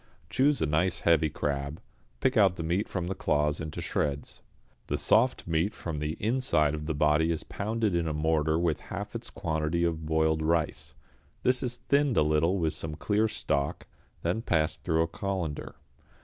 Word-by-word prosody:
Choose 140 +2 +3
a - - +3
nice 80 +5 +1
heavy 80 -2 +4
crab, 70 0 -3 0.4
pick 130 - +2
out 100 -5 +5
the 85 - -4
meat 90 +6 0
from 90 -3 -2
the 95 - -2
claws 75 -5 0
into 80 -1 -5
shreds. 70 -1 -2 0.5
The - - -1
soft - - +3
meat 85 +5 0
from 80 -4 -4
the 75 +1 -2
inside 110 - +1
of 75 0 -4
the 80 - -1
body 75 +2 +3
is 80 - -2
pounded 110 0 -1
in 85 -1 +1
a - - 0
mortar 80 0 +1
with 85 -3 +1
half - - -5
its - - -6
quantity 80 +1 -1
of 80 -2 -1
boiled 80 0 +2
rice; 80 0 -1 0.5
this 125 0 +2
is 120 -1 -3
thinned 140 -3 +3
a - - +5
little 80 +5 +2
with 80 -4 0
some 75 -1 -5
clear 105 +7 +1
stock, 70 -8 -2 0.4
then 110 - 0
passed 80 -6 0
through 80 -2 +2
a - - -1
colander. 85 -3 -4
80 Hz, 180 wpm, -29 LUFS, 75-95 Hz, 0.5 s, out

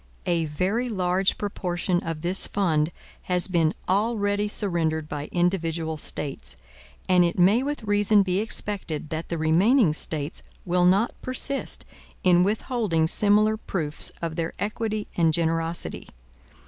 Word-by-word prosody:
A 170 -2 +1
very 190 +11 -1
large 185 -2 +1
proportion 180 -3 -2
of 165 -1 -5
this 180 +3 +3
fund 165 -5 +1 0.4
has 180 -1 +3
been 170 -4 +2 0.2
already 205 0 +1
surrendered 165 -7 0
by 145 -1 -5
individual 170 -3 0
States; 135 - -2 0.5
and 180 -1 +5
it 170 - 0
may 195 +7 +5
with 290 -2 -3
reason 205 0 +4
be 185 0 0
expected 200 -8 -3
that 160 +1 -4
the 170 - -2
remaining 170 - +3
States 155 -1 -3 0.2
will 180 0 +2
not 195 +6 +3
persist 270 +2 -2 0.4
in 180 -1 +5
withholding 210 -5 0
similar 210 +4 +3
proofs 160 -8 -1
of 165 -1 -3
their 165 -1 -2
equity 215 0 -3
and 165 -2 +3
generosity. 165 0 -2
180 Hz, 135 wpm, -25 LUFS, 165-205 Hz, 0.5 s, and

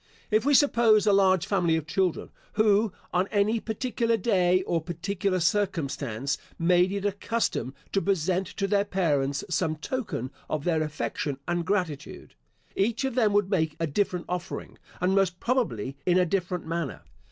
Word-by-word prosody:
If 215 +3 +3
we 290 - +5
suppose 230 -7 +5
a 205 - +4
large 190 -2 +4
family 175 -5 +2
of 160 -2 -2
children, 180 +1 -1 0.2
who, 215 0 +3 0.2
on 180 +2 +2
any 210 +3 +1
particular 230 +1 -1
day, 185 -3 +2
or 170 -2 -1
particular 185 +3 -2
circumstance, 155 - -1 0.2
made 180 +2 +3
it 200 0 -3
a 205 - +2
custom 200 - -2 0.2
to 195 - +1
present 190 -1 0
to 200 0 -3
their 200 0 +2
parents 145 -8 0
some 180 -4 0
token 155 - -4 0.2
of 155 -2 -2
their 160 -2 +1
affection 150 -2 -3
and 175 0 0
gratitude, 180 -8 -3 0.4
each 230 +7 0
of 265 - -1
them 225 -4 +3
would 205 -1 +2
make 160 -5 +1
a 165 - +1
different 180 +3 -1
offering, 180 0 -5 0.2
and 180 +2 +1
most 190 -2 +2
probably 200 - -1
in 180 0 +3
a 180 - +4
different 180 -1 -2
manner. 165 -3 -3
185 Hz, 165 wpm, -27 LUFS, 165-205 Hz, 0.4 s, we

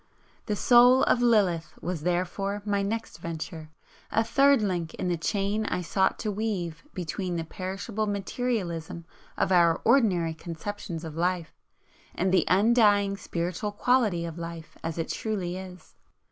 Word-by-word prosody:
"The 210 - 0
Soul 245 +4 +6
of 245 - +3
Lilith" 185 -9 +2
was, 170 -1 -4
therefore, 185 +4 -1
my 200 -1 +1
next 220 +3 -3
venture, 160 -1 -6 0.4
a 225 - +3
third 275 +4 +4
link 175 -5 -2
in 180 - -2
the 175 - +1
chain 200 +5 -1
I - - -1
sought 190 +3 +1
to 215 - -1
weave 195 -6 -3
between 180 0 -3
the 165 - -2
perishable 195 +5 -4
materialism 195 -6 -3 0.3
of - - +1
our 170 -2 +4
ordinary 200 -10 +3
conceptions 170 +1 -6
of 160 -2 -7
life, 175 -1 -1 0.6
and 185 +1 0
the 190 - +4
undying 205 -1 +4
spiritual 180 +2 -3
quality 210 -7 +2
of 165 0 -6
life 165 -1 -7
as 165 0 -3
it 165 - -3
truly 190 -5 -2
is. 185 -1 -10
185 Hz, 145 wpm, -27 LUFS, 170-210 Hz, 0.6 s, Soul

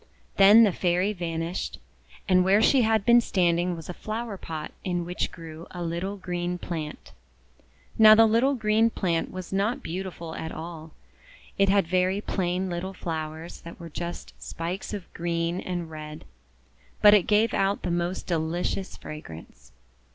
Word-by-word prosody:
Then 205 +4 +8
the 210 - +4
Fairy 180 +3 +1
vanished, 170 -1 -3 0.5
and 185 -1 +5
where 195 +3 +4
she 255 +4 +5
had 220 -3 +2
been 240 +1 +7
standing 175 -3 +1
was 165 -2 -9
a 180 - -5
flower 220 +2 -5
pot 160 -4 -6
in 175 -2 -2
which 180 +1 -2
grew 165 0 -10
a 175 -1 -6
little 175 +4 -3
green 180 -1 -3
plant. 160 -4 -6 0.9
Now 215 -1 +10
the 225 +1 +7
little 235 +6 +3
green 220 -1 +3
plant 170 -7 -1
was 185 0 -7
not 205 +5 0
beautiful 170 -1 -5
at 160 - -5
all. 160 -1 -8 0.7
It 195 0 +4
had 200 -1 +4
very 185 +3 +1
plain 185 -2 -1
little 185 +2 -4
flowers 160 -1 -5
that 170 - -11
were 170 -1 -8
just 170 +2 -6
spikes 175 +4 -5
of 205 -4 -5
green 170 +1 -1
and 175 -3 -4
red; 155 0 -8 0.8
but 210 0 +9
it 205 -4 +4
gave 215 +1 +3
out 195 +1 0
the 175 - -1
most 175 +2 -2
delicious 170 +3 -2
fragrance. 80 - -11
180 Hz, 160 wpm, -26 LUFS, 165-200 Hz, 0.9 s, Now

